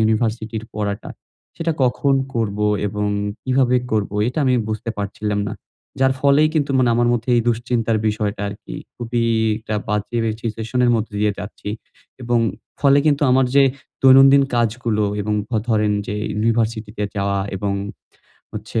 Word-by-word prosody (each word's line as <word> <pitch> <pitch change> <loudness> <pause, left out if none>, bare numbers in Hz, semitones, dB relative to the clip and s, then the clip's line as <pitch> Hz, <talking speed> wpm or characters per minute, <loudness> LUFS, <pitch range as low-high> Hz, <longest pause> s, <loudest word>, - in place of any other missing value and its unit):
ইউনিভার্সিটির 110 0 0
পড়াটা, 100 -1 -3 0.5
সেটা 165 0 -1
কখন 135 +2 +2 0.2
করব 105 -3 -1 0.3
এবং 105 +1 -2 0.3
কিভাবে 130 -1 +2 0.2
করবো 105 -2 0
এটা 125 - -4
আমি 130 -1 +3
বুঝতে 110 +2 -3
পারছিলাম 105 +1 -2
না। - - -5 0.5
যার 130 0 +4
ফলেই 145 +2 +4
কিন্তু 145 -3 +1
মানে 125 - +3
আমার 120 0 +2
মধ্যে 120 +1 -2
এই 120 - +3
দুশ্চিন্তার 115 -1 0
বিষয়টা 105 -1 -2
আরকি 100 +1 -9 0.2
খুবই 120 0 -2 0.4
একটা 110 -1 -5
বাজে 105 +3 -2 0.2
সিচুয়েশন 115 +2 -3
এর 120 - +4
মধ্যে 110 -1 -4
দিয়ে 105 0 +2
যাচ্ছি 105 0 -7 0.5
এবং 120 0 +1 0.4
ফলে 140 0 +5
কিন্তু 145 -1 +2
আমার 130 +1 +4
যে 140 - +7 0.4
দৈনন্দিন 135 +1 +7
কাজগুলো 115 -2 0 0.2
এবং 105 +1 -1
ধ - - -56 0.2
ধরেন 105 -2 +2
যে 105 - -3 0.2
ইউনিভার্সিটি 110 0 0
তে 105 - -1
যাওয়া 100 0 0 0.2
এবং 100 +1 -2 0.8
হচ্ছে - - -3
115 Hz, 150 wpm, -20 LUFS, 105-125 Hz, 0.8 s, যে